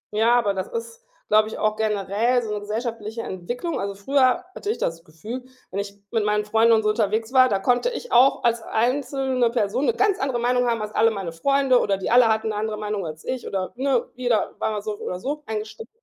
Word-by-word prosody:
Ja, 230 +3 +4
aber 210 -4 +1
das 190 -1 -3
ist, 465 +1 -7 0.2
glaube 215 0 +4
ich, - - -6
auch 215 0 +1
generell 215 +3 +1
so 215 -2 -4
'ne 210 - -2
gesellschaftliche 225 +1 -4
Entwicklung. 240 - -4
Also, 200 0 -3
früher 260 - +2
hatte 405 - -5
ich 440 - 0
das 165 0 -3
Gefühl, 210 +11 -8 0.3
wenn 195 - -3
ich 200 0 -5 0.2
mit 225 -3 +1
meinen 210 0 +1
Freunden 225 +2 +3
und 220 - +3
so 215 - +2
unterwegs 220 +2 0
war, 255 -1 +6
da 200 - +2
konnte 245 - +1
ich - - -7
auch 260 +3 +5
als 235 -1 +2
einzelne 255 +1 0
Person 235 +3 0
'ne - - +3
ganz 400 -1 +2
andere 265 -3 -1
Meinung 245 +1 +2
haben 230 -2 -1
als 210 - -5
alle 225 +1 +4
meine 195 -6 -4
Freunde, 270 +8 +2
oder 195 -4 +1
die 195 - -3
alle 245 -1 +6
hatten 220 0 +1
eine 210 - -4
andere 215 -1 -2
Meinung 210 -4 -3
als 155 0 -8
ich 255 -1 -4
oder, 190 -1 -3
ne, 260 -1 +1
jeder 245 -3 0
war 220 - 0
mal 210 - -3
so 210 0 -3
oder 180 - -4
so 290 +8 -3
eingestellt. 220 +1 -5
225 Hz, 230 wpm, -23 LUFS, 210-250 Hz, 0.3 s, war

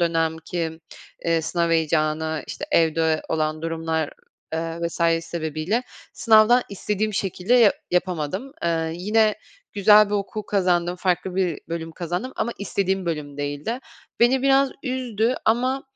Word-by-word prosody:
dönem 165 -1 +1
ki, 160 0 -4 0.4
eee, 165 -1 +2
sınav 170 +1 0
heyecanı, 160 -1 +1
işte, - - -5
evde 160 - +2
olan 155 0 -1
durumlar, 160 -1 -2 0.4
eee, 165 0 -3
vs. 170 - -10 0.3
sebebiyle 165 +6 -2 0.3
sınavdan 225 +2 +5
istediğim 210 +2 -2
şekilde 195 +3 0
ya 230 -5 +6 0.2
yapamadım. 180 - -1
Eee, 165 -1 0
yine 215 +4 +2 0.4
güzel 210 +1 +6
bir - - 0
okul 205 +1 -3
kazandım, 180 -3 +1
farklı 180 0 -1
bir 180 -4 0
bölüm 165 -1 -4
kazandım 180 +10 -4
ama 235 - -1
istediğim 195 -2 -1
bölüm 150 -3 -4
değildi. 145 - -3 0.4
Beni 255 +2 +4
biraz 275 0 +4
üzdü 250 -3 -1
ama 255 +4 +1
180 Hz, 130 wpm, -23 LUFS, 160-215 Hz, 0.4 s, ya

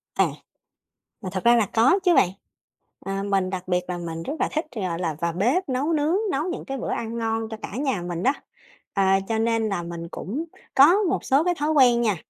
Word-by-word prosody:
À, - - +4 0.9
mà 185 - -5
thật 190 +2 -4
ra 240 0 +6
là 225 -3 +3
có 255 - +4
chứ 355 -2 +5
bạn, 175 - +5 0.7
ờ, 195 0 -4
mình 195 -2 0
đặc 185 -1 -5
biệt 180 -1 +2
là 180 - -2
mình 165 -1 -5
rất 285 - -4
là - - +1
thích, 310 - -1
gọi 185 -5 -2
là, 165 -4 -2
vào 170 0 0
bếp 250 - +1
nấu 270 +6 0
nướng, 305 +2 +1 0.2
nấu 275 +2 0
những - - -6
cái 270 0 -4
bữa - - -4
ăn 230 0 -3
ngon 225 -1 -2
cho 220 - -6
cả - - -7
nhà 265 -9 -1
mình 175 0 -4
đó, 265 - +4 0.6
ờ, 195 - +2 0.3
cho 225 - +1
nên 225 -1 +1
là 185 -4 -2
mình 170 0 -6
cũng 275 - -4 0.3
có 285 +6 +8 0.2
một - - -1
số 275 +3 +3
cái 355 +1 +2
thói 300 +1 +1
quen 250 -5 +5
nha, 215 -4 +2
225 Hz, 230 wpm, -24 LUFS, 185-270 Hz, 0.9 s, có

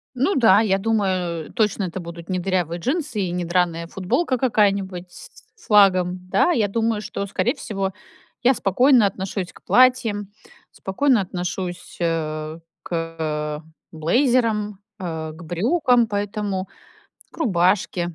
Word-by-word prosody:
Ну 280 +10 +1
да, 220 -5 +6
я 195 -3 +2
думаю, 185 -6 -1
точно, 210 -3 +1
это 185 0 -4
будут 170 0 -9
не 185 -1 0
дырявые 175 -2 -1
джинсы 265 - -2
и 180 -2 -1
не 175 0 -2
драная 170 -1 0
футболка 250 - -1
какая-нибудь 200 -7 0
с - - -12 0.3
с - - -19
флагом. 185 -3 +4
Да, - - +3
я 220 -11 +1
думаю, 225 0 0
что, 200 -1 -4
скорее 190 -1 0
всего, 200 -9 -3 0.5
я 255 +2 +5
спокойно 245 +3 +4
отношусь 190 -1 -3
к - - -18
платьям, 235 -5 +3 0.4
спокойно 245 +6 +1
отношусь, 180 -1 -5
э, 155 -2 -2 0.2
к 155 -2 -3 0.3
блейзерам, 210 - +1 0.2
а, 160 -3 -5
к 165 +2 -12
брюкам, 240 - +2
поэтому 205 -2 -3 0.6
к - - -15
рубашке. 185 - +1
195 Hz, 130 wpm, -22 LUFS, 175-225 Hz, 0.6 s, да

